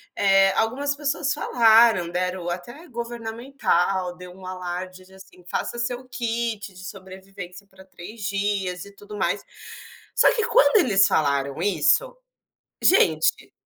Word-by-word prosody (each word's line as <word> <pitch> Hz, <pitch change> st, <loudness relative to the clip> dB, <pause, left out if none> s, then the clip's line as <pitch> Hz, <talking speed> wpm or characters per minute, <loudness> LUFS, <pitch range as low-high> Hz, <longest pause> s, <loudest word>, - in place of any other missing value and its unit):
eh, 195 Hz, -1 st, +4 dB
algumas 270 Hz, +6 st, 0 dB
pessoas 280 Hz, -1 st, -1 dB
falaram, 225 Hz, -6 st, +4 dB
deram 180 Hz, 0 st, -2 dB
até 240 Hz, -, -7 dB
governamental, 230 Hz, -6 st, -2 dB
deu 180 Hz, 0 st, -11 dB
um 185 Hz, 0 st, -13 dB
alarde 185 Hz, 0 st, -6 dB
de, 190 Hz, -, -20 dB
assim: 190 Hz, -1 st, -16 dB
"Faça 240 Hz, -, -3 dB
seu 245 Hz, +2 st, -3 dB
kit 230 Hz, -4 st, -3 dB
de 185 Hz, +1 st, -12 dB
sobrevivência 190 Hz, 0 st, -10 dB
para 190 Hz, -1 st, -18 dB
3 200 Hz, +4 st, -11 dB
dias." 195 Hz, -3 st, -2 dB
E 200 Hz, -, -13 dB
tudo 205 Hz, +1 st, -10 dB
mais. -, -, 0 dB, 0.7 s
Só -, -, +6 dB
que 455 Hz, -2 st, 0 dB
quando 475 Hz, -1 st, +4 dB
eles 195 Hz, -, +4 dB
falaram 140 Hz, -2 st, 0 dB
isso, 470 Hz, -, +2 dB, 0.7 s
gente 155 Hz, -, +3 dB
195 Hz, 130 wpm, -23 LUFS, 180-235 Hz, 0.7 s, Só